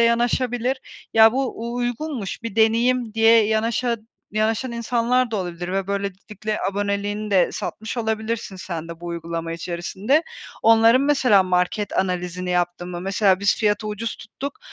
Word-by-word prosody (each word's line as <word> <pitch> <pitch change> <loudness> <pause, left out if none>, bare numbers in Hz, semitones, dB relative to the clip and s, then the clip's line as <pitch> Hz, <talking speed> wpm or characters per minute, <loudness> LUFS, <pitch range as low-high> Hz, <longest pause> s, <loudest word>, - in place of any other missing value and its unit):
yanaşabilir: 240 +2 +1 0.4
Ya 220 0 +7
bu 260 -2 -2
u - - -5
uygunmuş, 245 -2 -3
bir 230 -3 -6
deneyim 230 +1 +2
diye 225 -1 +5
yanaşa 230 +2 0 0.4
yanaşan 220 +3 0
insanlar 235 +1 +1
da 220 - -1
olabilir 175 -1 -4
ve 195 -1 -1
böylelikle 200 +2 -4
aboneliğini 205 +1 -2
de 185 -3 +3
satmış 220 +3 -5
olabilirsin 220 -2 -2
sen 170 -3 -6
de 170 0 -9
bu 175 - -8
uygulama 165 -1 -4
içerisinde. 185 - -1 0.4
Onların 225 +2 +6
mesela 265 -8 +4
market 185 +3 0
analizini 180 -1 -2
yaptın 175 0 -1
mı? 175 -1 -5
Mesela 190 0 +2
biz 200 +1 +3
fiyatı 210 0 +1
ucuz 215 +2 -4
tuttuk 280 - -7
215 Hz, 145 wpm, -22 LUFS, 185-235 Hz, 0.4 s, Ya